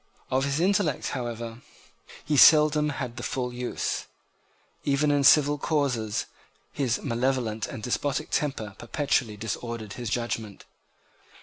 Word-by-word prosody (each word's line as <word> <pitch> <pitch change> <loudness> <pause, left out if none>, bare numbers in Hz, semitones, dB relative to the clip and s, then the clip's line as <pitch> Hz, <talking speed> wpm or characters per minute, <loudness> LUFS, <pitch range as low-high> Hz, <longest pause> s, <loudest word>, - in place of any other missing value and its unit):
Of 130 +1 +2
his 140 +2 -1
intellect, 185 -5 +1
however, 120 -1 -5 0.6
he 150 - 0
seldom 150 +1 +6
had 125 -4 -5
the - - -5
full 125 0 -3
use. 125 0 -3 0.8
Even 145 +1 +2
in 145 -1 +2
civil 145 0 +5
causes 125 -9 0 0.5
his 130 -5 0
malevolent 120 -3 -1
and 110 - -8
despotic 145 +4 -1
temper 120 -8 -1
perpetually 120 -3 -1
disordered 115 0 -5
his 120 -3 -5
judgment. 115 -3 -3
130 Hz, 120 wpm, -26 LUFS, 115-145 Hz, 0.8 s, seldom